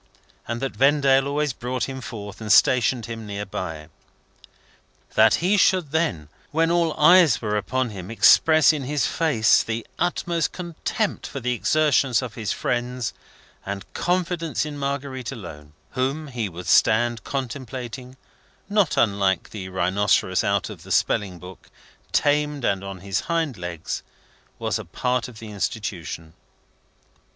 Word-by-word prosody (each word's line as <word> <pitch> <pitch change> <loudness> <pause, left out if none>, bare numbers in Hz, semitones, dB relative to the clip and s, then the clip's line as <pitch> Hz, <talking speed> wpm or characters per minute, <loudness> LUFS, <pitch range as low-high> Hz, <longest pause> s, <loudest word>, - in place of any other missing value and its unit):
and 115 +1 -3
that 135 - -1
Vendale 135 -1 +4
always 145 -1 0
brought 125 +1 -3
him 130 -1 -4
forth, 105 -4 -8
and 105 -1 -2
stationed 120 0 +4
him 115 -2 -7
near 100 0 -4
by. 80 -5 -6 1.3
That 110 0 +5
he 190 +5 +2
should 180 -6 +3
then, 155 - 0 0.2
when 165 +2 +1
all 170 -2 +2
eyes 170 -9 +6
were 105 -2 -2
upon 125 +3 -1
him, 95 -2 -8
express 155 +7 +6
in 145 -4 -4
his 145 -2 0
face 140 -10 +3
the 115 0 -4
utmost 175 -1 0
contempt 180 +4 -3
for 140 - -6
the 125 0 -1
exertions 140 -2 +2
of 120 -3 -6
his 110 -1 -3
friends 125 -1 -2 0.5
and 100 0 -6
confidence 175 -4 -1
in 150 -1 -6
Marguerite 140 -3 -3
alone, 75 -8 -10 0.2
whom 140 +4 -2
he 120 -6 -3
would 90 0 -9
stand 115 +1 +3
contemplating, 130 -1 -5 0.5
not 205 -4 +1
unlike 100 -4 +1
the 95 -3 -6
rhinocerous 95 +2 +1
out - - +1
of - - -10
the - - -11
spelling 95 -4 +1
book, 90 +1 -13 0.4
tamed 145 -2 +1
and 100 -1 0
on 95 -2 -7
his 100 0 -1
hind 165 -6 -1
legs, 85 -3 -5 0.6
was - - -2
a - - -7
part 125 0 -1
of 120 -4 -12
the 110 -1 -9
Institution. 85 - -4
125 Hz, 145 wpm, -23 LUFS, 105-150 Hz, 1.3 s, eyes